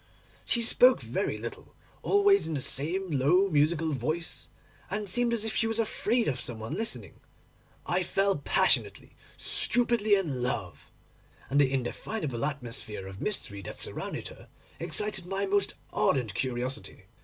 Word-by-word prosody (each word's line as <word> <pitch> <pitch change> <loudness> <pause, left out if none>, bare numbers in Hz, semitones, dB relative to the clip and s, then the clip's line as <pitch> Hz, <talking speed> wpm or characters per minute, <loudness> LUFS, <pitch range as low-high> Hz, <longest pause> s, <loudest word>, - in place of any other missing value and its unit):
She 235 - +3
spoke 250 +2 +5
very - - -2
little, - - -8 0.3
always 405 0 +4
in 160 - -3
the - - -1
same 170 +8 -1
low 155 +8 +3
musical 155 0 +2
voice, 155 +6 -3 0.4
and 210 +2 -3
seemed 240 +4 +2
as 225 -2 -1
if 220 - -3
she 225 - +1
was 225 0 0
afraid 230 +1 0
of 130 -3 -1
some 120 - -1
one 110 +6 -6
listening. 220 +6 -4 0.7
I 180 +1 0
fell 195 -1 +1
passionately, - - +2 0.3
stupidly 235 -4 +3
in 155 -10 -2
love, 110 -8 -4 0.6
and 145 +1 +4
the 135 -2 +2
indefinable 135 - -3
atmosphere 120 -8 -4
of 95 0 -9
mystery 100 - -2
that - - -8
surrounded - - -2
her - - -15 0.3
excited 210 -4 -1
my 195 +1 -1
most 200 0 0 0.2
ardent 125 -8 +1
curiosity. 130 -1 -3
170 Hz, 145 wpm, -28 LUFS, 130-210 Hz, 0.7 s, spoke